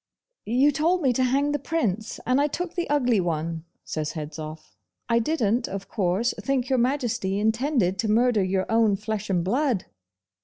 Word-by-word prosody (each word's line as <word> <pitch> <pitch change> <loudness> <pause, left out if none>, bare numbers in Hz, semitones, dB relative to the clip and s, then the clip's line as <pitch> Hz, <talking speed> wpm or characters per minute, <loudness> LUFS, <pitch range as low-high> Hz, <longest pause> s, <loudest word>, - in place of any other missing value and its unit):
'You 260 +6 +4
told 330 +5 +1
me 260 -3 +3
to 255 - +1
hang 275 +3 +2
the 290 - -1
Prince, 225 - -2
and 255 +3 +3
I 290 - +3
took 350 +3 -4
the 345 -4 -3
ugly 250 -7 +2
one,' 165 -1 -2 0.2
says 155 -1 -3
Hedzoff. 155 0 -7 0.3
'I 230 0 +4
didn't, 235 -3 0
of 195 0 -6
course, 200 +4 0
think 265 -2 -1
Your 260 -2 +2
Majesty 240 -7 0
intended 220 - +1
to 220 -1 0
murder 230 -1 +3
your 185 0 0
own 225 -2 +3
flesh 215 0 -4
and 180 -3 +1
blood! 245 - 0
230 Hz, 175 wpm, -25 LUFS, 190-270 Hz, 0.3 s, You